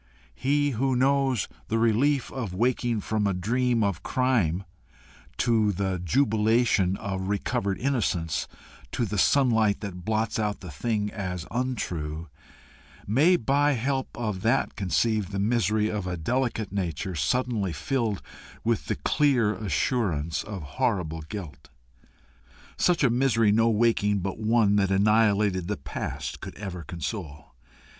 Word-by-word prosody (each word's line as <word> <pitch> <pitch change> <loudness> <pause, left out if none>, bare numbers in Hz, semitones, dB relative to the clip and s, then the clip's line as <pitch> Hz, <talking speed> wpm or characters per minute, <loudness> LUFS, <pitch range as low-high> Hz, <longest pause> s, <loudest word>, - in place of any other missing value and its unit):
He 145 - +1
who 130 +2 0
knows 135 -2 +2 0.2
the 115 - 0
relief 120 +5 +2
of 115 -9 -4
waking 120 0 +1
from 105 0 0
a 100 - 0
dream 120 +5 +1
of 100 -5 -1
crime 110 -9 +1 0.7
to 110 -3 +2
the 95 -1 -2
jubilation 110 - +2
of 95 -1 -4
recovered 100 -1 -1
innocence, 95 - -1 0.5
to 120 - 0
the 105 -1 -2
sunlight 115 -5 +3
that 90 -4 -6
blots 110 +2 -1
out 105 -1 -1
the 90 -3 -8
thing 105 +7 -1
as 90 -4 -4
untrue, 85 - -3 0.8
may 145 - +4
by 145 +1 +2
help 130 +2 -2
of 105 -6 -3
that 115 +5 +1
conceive 105 +1 0
the 100 - -4
misery 105 0 +1
of 105 -3 -3
a 90 -1 -3
delicate 115 +3 -1
nature 95 -1 -3
suddenly 105 - 0
filled 110 - -2 0.4
with 115 -3 0
the - - 0
clear 120 - +2
assurance 95 - -1
of 100 -5 -6 0.2
horrible 80 -7 0
guilt. 80 -4 -8 1.1
Such 175 -4 +2
a 125 - +4
misery 115 -4 +3
no 115 +2 +4
waking 105 -3 +2
but 95 +3 -4
one 110 -2 +3
that 100 -1 +2
annihilated 100 -2 +3
the 105 0 -2
past 70 - -5
could - - -8
ever 95 -4 -6
console. 80 - -6
105 Hz, 135 wpm, -26 LUFS, 95-120 Hz, 1.1 s, may